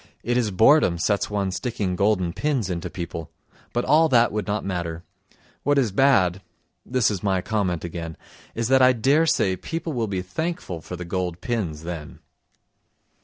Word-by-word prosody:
It 120 +1 0
is 120 -3 +1
boredom 110 - +4
sets 100 +4 0
one 100 -2 -1
sticking 95 -1 -2
golden 95 -3 +1
pins 130 -5 -1
into 90 +1 -3
people, 85 -2 -6 0.4
but 120 - -1
all 155 +4 +5
that 120 -3 +4
would 105 -2 -3
not 105 0 -2
matter. 85 -3 -3 0.6
What 145 +1 +2
is 125 -7 +2
bad 95 -6 +3 0.4
(this 125 -4 +1
is 100 -4 -3
my 95 -2 +1
comment 95 -5 -1
again) 85 -1 -6 0.4
is 115 0 -1
that 130 0 +5
I 130 0 +6
dare 140 +7 +3
say 95 -10 +2
people 165 - -5
will 115 -3 -1
be 95 -2 -3
thankful 125 - -4
for 90 - -7
the 90 0 -7
gold 90 -1 -3
pins 90 -10 -3
then. 80 -3 -6
100 Hz, 170 wpm, -24 LUFS, 90-125 Hz, 0.6 s, I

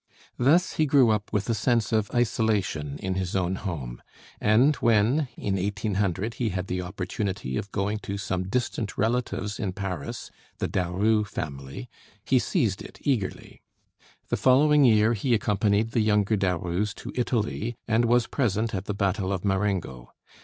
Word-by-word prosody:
Thus 155 +9 +3
he 155 - +3
grew 135 -5 +5
up 105 -1 -1
with 105 -2 -1
a 115 - +1
sense 115 -1 +1
of 110 -2 +1
isolation 105 - 0
in 95 +3 -3
his 95 -1 -3
own 95 -1 +1
home, 75 - -5 0.4
and 125 +8 +4
when, 115 +6 +3
in 100 -1 -1
1800, 100 +1 -1
he 115 -2 -1
had 90 -1 -3
the 90 -1 -2
opportunity 90 -5 -4
of 100 - -4
going 100 +2 -1
to 100 -1 -5
some 95 -2 -3
distant 120 -2 -2
relatives 110 -2 -1
in 95 -4 -2
Paris, 90 -7 -5 0.3
the - - -1
Daru 100 +5 +1
family, 70 -9 -6 0.4
he 130 - +3
seized 115 - 0
it - - -11
eagerly. 120 -9 -2 0.7
The - - 0
following 145 +2 +5
year 110 -1 +5
he 120 +3 +1
accompanied 105 +1 +1
the 115 - +2
younger 105 0 +2
Darus 95 +1 -1
to - - -8
Italy, 120 -1 -1
and 115 +1 +3
was 120 0 +3
present 115 -4 -1
at 95 0 -3
the 105 - -3
battle 100 0 0
of 95 0 -2
Marengo. 95 -10 -1
105 Hz, 160 wpm, -26 LUFS, 95-115 Hz, 0.7 s, grew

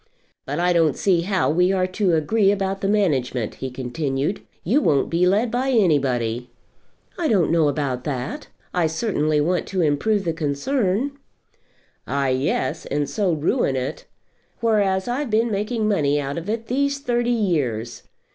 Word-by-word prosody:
"But 145 +2 -2
I 180 0 +3
don't 160 -5 +2
see 180 -4 +2
how 185 -3 +1
we 180 +3 +3
are 185 -1 +1
to 185 -1 +1
agree 195 +6 +2
about 195 -1 -2
the 195 - 0
management," 135 - 0
he 130 - -2
continued. 135 +6 -2 0.2
"You 245 - +2
won't 140 - +2
be 175 +2 +3
led 215 +5 +2
by 255 +3 0
anybody." 130 - +1 0.7
"I 335 - +1
don't 190 - +2
know 165 -2 +3
about 135 -3 -1
that. 135 -2 -4 0.3
I 175 -2 +2
certainly 155 -4 0
want 175 +5 0
to 190 -2 -1
improve 185 +7 +1
the 165 - 0
concern." 200 - -1 0.9
"Ah, 140 -1 0
yes; 130 0 -1
and 145 0 -1
so 200 -4 0
ruin 155 - +1
it. 130 0 -4 0.5
Whereas 200 -4 +1
I've 255 +2 -2
been 225 +2 +1
making 215 +2 -1
money 145 -8 +2
out 140 +2 -3
of 170 +5 -8
it 225 +1 -2
these 280 +3 0
thirty 240 -3 -1
years. 145 - -1
180 Hz, 160 wpm, -22 LUFS, 145-215 Hz, 0.9 s, I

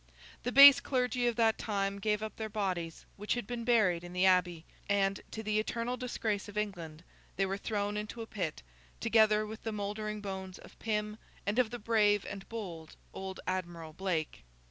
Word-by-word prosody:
The 245 - -2
base 275 +1 +10
clergy 250 -2 0
of 240 - +1
that 225 -1 +2
time 200 -2 -1
gave 210 +1 0
up 220 - -6
their 220 -1 -4
bodies, 185 -6 -3
which 210 +3 -1
had 240 - -3
been 240 +1 -4
buried 210 -8 +3
in 175 0 -9
the 180 +1 +2
Abbey, 180 -3 +3 0.2
and—to 200 +2 -1
the 215 0 +1
eternal 230 +3 -2
disgrace 225 -5 -3
of 205 - -9
England—they 180 -1 -4
were 195 0 -2
thrown 205 0 -2
into 215 +2 -5
a - - -7
pit, 185 - -4 0.4
together 215 -1 +4
with 220 +1 -8
the 225 - -3
mouldering 210 +1 -3
bones 190 -2 -6
of - - -16
Pym 210 -1 -2 0.3
and 210 +5 0
of 245 -3 +3
the 240 - -5
brave 210 -3 +2
and 195 -1 -8
bold 175 -8 -7 0.2
old 190 0 -6
Admiral 170 -4 -4
Blake. 170 - -3
210 Hz, 180 wpm, -32 LUFS, 190-220 Hz, 0.4 s, base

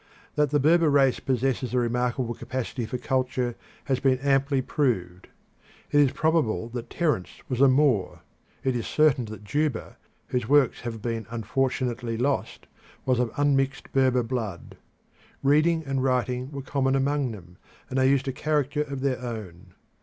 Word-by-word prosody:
That 150 -1 +2
the 145 +1 +2
Berber 160 +3 +4
race 135 -3 +3
possesses 130 -1 -1
a - - +3
remarkable 120 0 0
capacity 125 0 -4
for 125 - -3
culture 130 -2 -1 0.3
has 130 -2 0
been 130 -1 +3
amply 135 +1 +2
proved. 95 -10 -1 0.6
It 145 - +4
is 140 -3 +5
probable 155 -8 +1
that 120 0 -6
Terence 150 - 0 0.2
was 125 -1 -1
a 140 - +8
Moor. 130 -8 +2 0.4
It 130 -2 +1
is 120 - -2
certain 150 -5 +3
that 110 -1 -9
Juba, 145 +2 -2 0.3
whose 125 -3 -2
works 145 -2 +4
have 115 -3 -6
been 115 -3 -3
unfortunately 120 0 -1
lost, 135 +4 -1 0.4
was 130 -2 +2
of 125 -2 +1
unmixed 135 -1 +1
Berber 130 -2 +3
blood. 115 -8 -4 0.7
Reading 155 +4 +3
and 135 -1 -1
writing 125 0 0
were 140 -2 -6
common 135 -1 0
among 140 0 +1
them, 90 -5 -11 0.3
and 130 - -1
they 130 0 +4
used 140 0 +2
a - - +1
character 150 0 0
of 140 -3 -4
their 130 -2 0
own. 100 -7 -7
130 Hz, 160 wpm, -26 LUFS, 120-140 Hz, 0.7 s, a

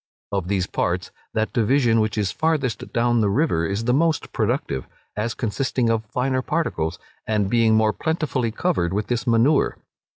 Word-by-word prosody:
Of 95 -3 -1
these 95 -2 0
parts, 90 0 -2 0.2
that 110 0 0
division 120 0 +3
which 110 0 0
is 100 -3 0
farthest 145 - -1
down 120 0 +2
the 105 - +2
river 100 - +1
is 100 +4 -2
the 125 +1 +2
most 160 +3 +1
productive, 65 -2 -1 0.3
as 110 +2 -2
consisting 120 +1 0
of 110 -1 -1
finer 130 +3 0
particles, 90 - -1 0.3
and 105 -2 0
being 115 -2 +4
more 110 -1 +3
plentifully 155 -7 -1
covered 110 - 0
with 105 +1 -1
this 120 +1 -1
manure. 120 +6 +3
115 Hz, 165 wpm, -23 LUFS, 105-130 Hz, 0.3 s, being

